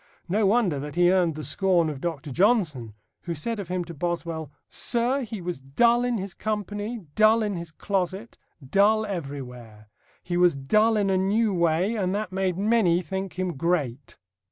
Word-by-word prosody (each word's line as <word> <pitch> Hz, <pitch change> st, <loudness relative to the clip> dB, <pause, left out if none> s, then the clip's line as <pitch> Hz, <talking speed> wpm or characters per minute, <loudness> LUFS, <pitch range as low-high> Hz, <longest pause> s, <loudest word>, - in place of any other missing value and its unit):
No 200 Hz, +3 st, +2 dB
wonder 200 Hz, -9 st, +2 dB
that 150 Hz, +2 st, -7 dB
he 175 Hz, 0 st, +4 dB
earned 175 Hz, -4 st, +2 dB
the 155 Hz, -, -6 dB
scorn 180 Hz, -3 st, +2 dB
of 145 Hz, -3 st, -5 dB
Dr. 155 Hz, -4 st, -4 dB
Johnson, 155 Hz, -, +1 dB, 0.3 s
who 170 Hz, -1 st, -3 dB
said 220 Hz, +9 st, -3 dB
of 195 Hz, -, -5 dB
him 180 Hz, 0 st, -2 dB
to 170 Hz, -, -8 dB
Boswell, 165 Hz, -2 st, -3 dB, 0.2 s
"Sir, 245 Hz, +3 st, 0 dB
he 220 Hz, -5 st, -6 dB
was 175 Hz, -4 st, -4 dB
dull 235 Hz, -, +2 dB
in 245 Hz, -1 st, 0 dB
his 195 Hz, -2 st, -5 dB
company, 210 Hz, +1 st, -4 dB
dull 220 Hz, +3 st, +4 dB
in 205 Hz, -2 st, -2 dB
his 170 Hz, -2 st, -6 dB
closet, 195 Hz, +5 st, -3 dB, 0.3 s
dull 210 Hz, +7 st, +3 dB
everywhere. 125 Hz, -, -7 dB, 0.3 s
He 175 Hz, 0 st, -2 dB
was 175 Hz, -3 st, +4 dB
dull 215 Hz, +12 st, +2 dB
in 200 Hz, -2 st, +1 dB
a 190 Hz, -, +2 dB
new 205 Hz, +3 st, +1 dB
way, 170 Hz, +4 st, +1 dB
and 190 Hz, -3 st, -1 dB
that 210 Hz, -2 st, -3 dB
made 185 Hz, -2 st, -1 dB
many 200 Hz, -4 st, +2 dB
think 190 Hz, +3 st, -5 dB
him 185 Hz, -1 st, -1 dB
great." 140 Hz, -5 st, -2 dB
185 Hz, 180 wpm, -25 LUFS, 160-210 Hz, 0.3 s, he